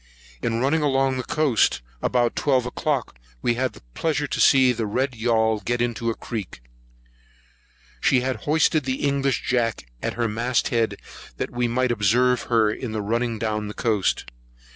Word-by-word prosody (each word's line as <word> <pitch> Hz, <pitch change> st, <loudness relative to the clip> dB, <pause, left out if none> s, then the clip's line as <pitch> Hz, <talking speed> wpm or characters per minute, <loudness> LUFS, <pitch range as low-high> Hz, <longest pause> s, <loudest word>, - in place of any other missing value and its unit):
In 115 Hz, 0 st, -1 dB
running 140 Hz, +6 st, +2 dB
along 135 Hz, -2 st, +1 dB
the 125 Hz, -, -2 dB
coast, 135 Hz, -, +1 dB, 0.2 s
about 120 Hz, -1 st, +1 dB
twelve 130 Hz, -4 st, +2 dB
o'clock, 125 Hz, -, -2 dB, 0.2 s
we 120 Hz, -, +3 dB
had 130 Hz, +2 st, -1 dB
the -, -, -16 dB
pleasure 150 Hz, -3 st, 0 dB
to -, -, -3 dB
see 130 Hz, -2 st, +6 dB
the 110 Hz, -2 st, -2 dB
red 130 Hz, +6 st, 0 dB
yaul 110 Hz, -2 st, +1 dB
get 120 Hz, +3 st, -1 dB
into 120 Hz, -1 st, -1 dB
a 115 Hz, -, -1 dB
creek. 105 Hz, -, -6 dB, 1.4 s
She 130 Hz, -2 st, +3 dB
had 130 Hz, 0 st, -1 dB
hoisted 155 Hz, -1 st, +2 dB
an 130 Hz, -, +1 dB
English 140 Hz, -1 st, 0 dB
jack 115 Hz, -, 0 dB, 0.2 s
at -, -, -3 dB
her 120 Hz, -1 st, 0 dB
mast 120 Hz, +3 st, 0 dB
head, 115 Hz, -2 st, 0 dB, 0.4 s
that -, -, -3 dB
we 120 Hz, 0 st, 0 dB
might 125 Hz, +1 st, +1 dB
observe 120 Hz, +3 st, +2 dB
her 110 Hz, -3 st, +3 dB
in 110 Hz, 0 st, -4 dB
running 115 Hz, +2 st, -1 dB
down 105 Hz, -1 st, -2 dB
the 105 Hz, -, -7 dB
coast. 110 Hz, -5 st, 0 dB
120 Hz, 165 wpm, -23 LUFS, 115-130 Hz, 1.4 s, see